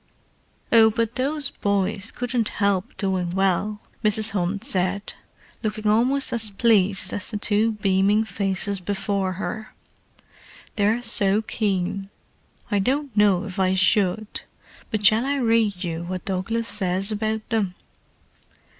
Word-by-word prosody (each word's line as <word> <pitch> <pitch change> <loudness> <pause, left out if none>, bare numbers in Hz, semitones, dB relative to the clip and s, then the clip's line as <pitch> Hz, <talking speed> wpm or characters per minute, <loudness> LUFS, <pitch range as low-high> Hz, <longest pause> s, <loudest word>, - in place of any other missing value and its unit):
"Oh, 225 -1 +7
but 230 +1 -1
those 280 +1 -1
boys 200 +1 -1
couldn't 245 -2 -2
help 200 +1 0
doing 190 -3 -1
well," 195 +3 0 0.2
Mrs. 215 +1 +3
Hunt 195 +1 -2
said, 195 -4 0 0.5
looking 215 -1 -3
almost 245 +6 +2
as 225 -2 0
pleased 200 -2 +2
as 205 - -2
the 215 - -3
two 215 +1 +2
beaming 200 +1 +2
faces 195 -1 -2
before 195 0 -2
her. 215 +3 -6 1.0
"They're 220 +3 +1
so 210 -2 +2
keen. 195 -3 -2 0.6
I 205 - +2
don't 265 +4 -1
know 205 -3 +3
if 195 -2 -7
I 190 0 +2
should, 195 +2 +1 0.5
but 215 -3 -2
shall 220 +2 +5
I 280 +2 -1
read 225 -7 +1
you 165 -2 -3
what 180 +1 -6
Douglas 220 +4 -2
says 195 0 +1
about 215 +1 -2
them?" 205 -6 -1
205 Hz, 130 wpm, -23 LUFS, 190-220 Hz, 1.0 s, Oh